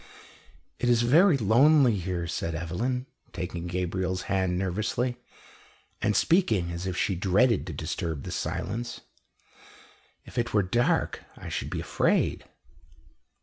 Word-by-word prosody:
"It 120 - +1
is 120 -1 +4
very 160 +7 +5
lonely 130 +3 +5
here," 90 -2 -3
said 85 -1 -3
Evelyn, 115 +11 -2 0.3
taking 90 -1 -4
Gabriel's 90 +1 -2
hand 95 -2 0
nervously, 110 +7 -1 0.8
and 105 - +1
speaking 110 - +2
as 85 +2 -4
if 90 -1 -3
she 100 - +1
dreaded 95 +5 +2
to 85 - -5
disturb 80 0 -4
the - - -6
silence. 115 +7 -4 1.2
"If 125 - -5
it 120 -1 -1
were 105 - +4
dark, 120 +6 0
I - - -8
should - - -3
be - - -3
afraid." - - +1
95 Hz, 130 wpm, -27 LUFS, 90-120 Hz, 1.2 s, very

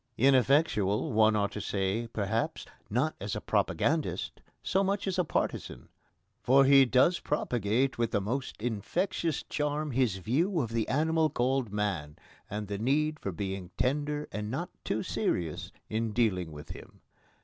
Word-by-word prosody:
Ineffectual, 130 - +3
one 110 0 +5
ought 100 -1 +1
to 105 - -5
say, 100 +3 -1
perhaps, 110 +1 -2 0.2
not 130 +9 0
as 105 +2 -3
a - - -2
propagandist - - 0 0.2
so 190 +1 +2
much 195 +1 0
as 190 -2 -1
a - - +4
partisan. - - -3 0.5
For 135 +2 +5
he 135 0 +7
does 130 +8 +3
propagate 125 -2 0
with 115 -1 +1
the 105 - +1
most 125 +7 -3
infectious 145 - -1
charm 150 0 -2
his 125 -5 +1
view 160 - 0
of 120 -6 -2
the 115 -1 0
animal 160 +2 +2
called 130 -3 0
man, 95 -8 -2 0.3
and 105 0 -4
the 100 0 -4
need 150 +6 +1
for 100 - -3
being 95 -1 -4
tender 150 +3 0
and 105 0 -4
not - - -3
too - - -1
serious 80 -3 -2 0.2
in 110 0 -2
dealing 95 -8 +1
with 75 -1 -10
him. - - -11
120 Hz, 155 wpm, -30 LUFS, 105-145 Hz, 0.5 s, he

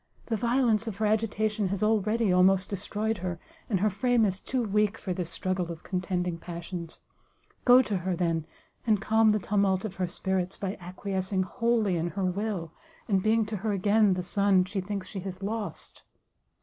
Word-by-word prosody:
the 230 - -1
violence 235 -1 +2
of 220 - -3
her 215 +2 -1
agitation 215 -1 +1
has 200 +2 -2
already 215 -1 +2
almost 185 +1 +4
destroyed 205 +2 -2
her, 175 -1 -4 0.3
and 195 -5 +1
her 215 - +4
frame 235 +3 +2
is 190 -1 -1
too 255 +3 -2
weak 210 0 +1
for 185 - -3
this 175 -2 -4
struggle 185 -2 -2
of 165 -1 -9
contending 180 -2 -2
passions; 170 0 -7 0.6
go 250 +1 +8
to 205 -5 -1
her, 180 0 -1
then, 165 -2 -1 0.4
and 215 -2 +4
calm 220 +2 +4
the 210 - +4
tumult 195 -1 +1
of 195 -3 -6
her 185 -1 0
spirits, 185 +1 -2
by 195 0 -3
acquiescing 185 +1 -2
wholly 225 -2 +1
in 165 +1 -1
her 190 +2 -2
will, 185 -3 -2 0.3
and 195 -3 +2
being 220 +2 +3
to 215 0 -4
her 210 +2 -1
again 205 0 +3
the 180 - -3
son 195 -1 +3
she 195 +1 -3
thinks 195 0 -4
she 200 - -6
has 190 0 -7
lost!" 215 +1 -5
195 Hz, 185 wpm, -28 LUFS, 185-215 Hz, 0.6 s, go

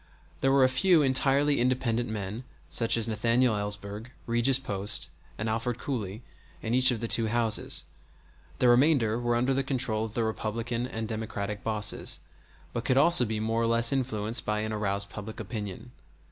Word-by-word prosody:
There 135 - +2
were 135 -1 +4
a - - +6
few 155 +5 +3
entirely 140 +2 +2
independent 120 -2 0
men 105 +2 -5 0.3
such 115 0 +2
as 115 0 +1
Nathaniel 115 +2 +1
Elsberg, 105 +2 -5 0.2
Regis 120 +3 +4
Post, 100 -6 0 0.3
and 110 - -3
Alford 115 +2 -2
Cooley, 110 -5 -5 0.4
in 115 - -2
each 130 +1 +6
of 120 -3 -1
the 115 - -2
two 115 0 +1
houses; 115 -1 +2 0.7
the 125 - +2
remainder 120 -3 +3
were 120 0 0
under 125 +3 +1
the 135 - +1
control 125 -5 0
of 110 - -10
the 115 - 0
Republican 115 +2 -3
and 110 -2 -5
Democratic 105 -2 -5
bosses, 110 -2 0 0.5
but 120 - -3
could 130 +2 +1
also 150 -2 +5
be 110 -1 -3
more 115 +1 -1
or 115 - +1
less 115 +2 +3
influenced 115 -4 0
by 105 0 -1
an 110 0 -3
aroused 100 -2 -2
public 110 +1 -8
opinion. 105 +1 -6
115 Hz, 175 wpm, -28 LUFS, 110-125 Hz, 0.7 s, a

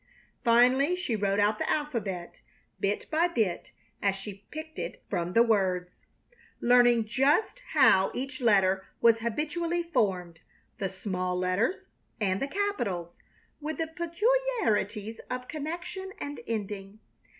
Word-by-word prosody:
Finally 255 +7 +5
she 360 -11 -2
wrote 200 -1 +1
out 210 +1 +2
the - - -1
alphabet, 215 - -2 0.4
bit 200 +1 -1
by 325 +3 +3
bit 220 - -1 0.3
as 200 -1 +2
she 195 0 -9
picked 315 +1 -7
it - - -5
from 175 +1 -1
the 230 - +6
words, 185 -5 0 0.6
learning 240 -2 +5
just 285 - +2 0.2
how 190 0 +6
each 260 +1 -4
letter 195 -4 +4 0.2
was 230 -1 +5
habitually 315 +9 -1
formed, 185 - -1 0.4
the 195 - -1
small 185 -1 -3
letters 185 - 0 0.4
and 195 -3 0
the 275 - 0
capitals, 240 - -2 0.4
with 310 +1 -4
the 325 - 0
peculiarities 340 - 0
of 250 0 -4
connection 350 +5 -5
and 285 -2 -5
ending. 205 -2 -4
230 Hz, 130 wpm, -29 LUFS, 195-310 Hz, 0.6 s, the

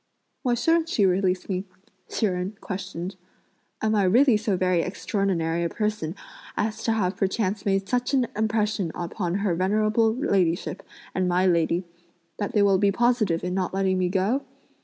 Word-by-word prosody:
"Why 245 -3 +1
shouldn't 325 +6 +2
she 205 - +2
release 185 0 +1
me?" 185 -1 -2 0.5
Hsi 225 - 0
Jen 185 +1 -2
questioned. 185 -1 -5 0.7
"Am 215 0 +2
I 210 - +3
really 240 +6 +5
so 210 -3 0
very 185 -2 +2
extraordinary 180 -3 -1
a 170 - 0
person 210 -6 -2 0.4
as 215 +1 -1
to 225 - +2
have 195 -4 0
perchance 195 0 -1
made 195 0 +1
such 250 +2 0
an 255 -2 +3
impression 215 -4 0
upon 175 +1 -3
her 185 - +2
venerable 215 +5 +2
ladyship 185 - 0 0.3
and 185 -1 0
my 180 +1 +2
lady 170 0 +2 0.6
that 205 +3 -2
they 210 -3 +4
will 195 -2 +4
be 200 0 +3
positive 220 -6 +1
in 180 0 -2
not 185 0 -1
letting 190 -1 +1
me 180 -1 +1
go? 200 +8 +1
195 Hz, 165 wpm, -25 LUFS, 180-215 Hz, 0.7 s, really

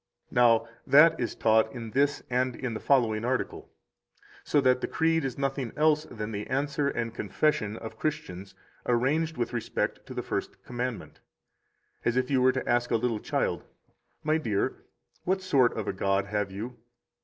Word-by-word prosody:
Now, 120 -2 +4 0.2
that 165 +3 +7
is 120 - -2
taught 110 0 +3
in 115 -2 -7
this 145 +3 +1
and 125 0 0
in 125 -3 -4
the 110 - -4
following 115 -6 +2
article, 125 +1 -2 0.7
so 145 - +2
that 130 -1 +3
the - - -1
Creed 165 0 +1
is 135 -2 -3
nothing 135 -3 -2
else 155 0 +3
than 105 -2 -6
the 105 0 -4
answer 140 +2 0
and 115 -4 -2
confession 110 -1 0
of 110 - -9
Christians 100 -12 -4 0.3
arranged 150 +7 +1
with 120 0 -2
respect 120 - -2
to - - -8
the - - -3
First - - -4
Commandment. 125 -1 -5 0.8
As 120 +1 +1
if 130 +1 0
you 130 -2 +3
were 130 0 +5
to 130 0 -4
ask 120 0 +2
a - - +2
little 115 -1 0
child: - - -1
11 - - -25 0.5
My 155 +1 +2
dear, 105 -9 0 0.5
what 190 +1 0
sort 135 -11 +3
of 110 - -3
a - - -1
God 95 +1 +1
have 105 0 -1
you? 115 +5 -7
125 Hz, 180 wpm, -28 LUFS, 110-140 Hz, 0.8 s, that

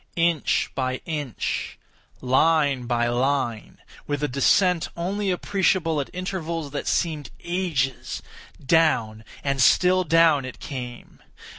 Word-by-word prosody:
Inch 170 -3 +1
by 130 -1 -1
inch—line 145 -1 -1
by 120 -1 +1
line—with 130 +2 -2
a - - +2
descent 170 +6 +2
only 195 +4 -2
appreciable 180 -4 +1
at 135 - -7
intervals 170 -5 -4
that 145 - -4
seemed 155 -4 -1
ages—down 140 -6 -1 0.2
and 135 -1 0
still 185 +8 +4
down 165 -3 +4
it 130 -1 -8
came! 125 -4 -8
150 Hz, 100 wpm, -24 LUFS, 130-170 Hz, 0.2 s, still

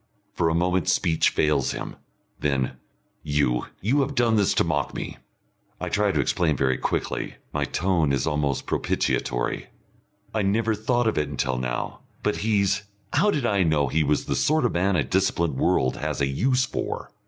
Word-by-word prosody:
For 85 - +1
a 80 - 0
moment 90 0 +1
speech 80 -1 +3
fails 75 -4 +1
him, - - -6 0.4
then; 70 -3 0 0.5
"You 70 -4 0
you 130 +9 +2
have 140 +1 -2
done 120 -2 +3
this 100 -3 +2
to - - +4
mock 75 -5 -1
me." - - -5 0.6
I - - -3
try 105 -1 +2
to - - 0
explain 80 -6 +1
very 65 -2 +1
quickly. - - -2 0.2
My 75 -1 0
tone 85 -1 +1
is 70 -2 +1
almost 75 -3 0
propitiatory. - - -1 0.7
"I 110 - +1
never 110 +3 +1
thought 120 +3 0
of 110 - +1
it 75 -1 -1
until 65 -2 -1
now. 60 -1 -3 0.2
But 105 - +1
he's 100 -2 +1 0.3
How 210 - +4
did 145 -10 0
I 100 -4 +2
know 75 -5 +2
he 80 +4 +2
was 75 0 +1
the - - -1
sort 155 -3 +2
of 120 - +2
man 95 +2 +1
a 75 - +2
disciplined 85 -1 0
world 65 0 +2
has - - -3
a 70 - +2
use 125 - +1
for?" - - -4
85 Hz, 180 wpm, -25 LUFS, 70-105 Hz, 0.7 s, to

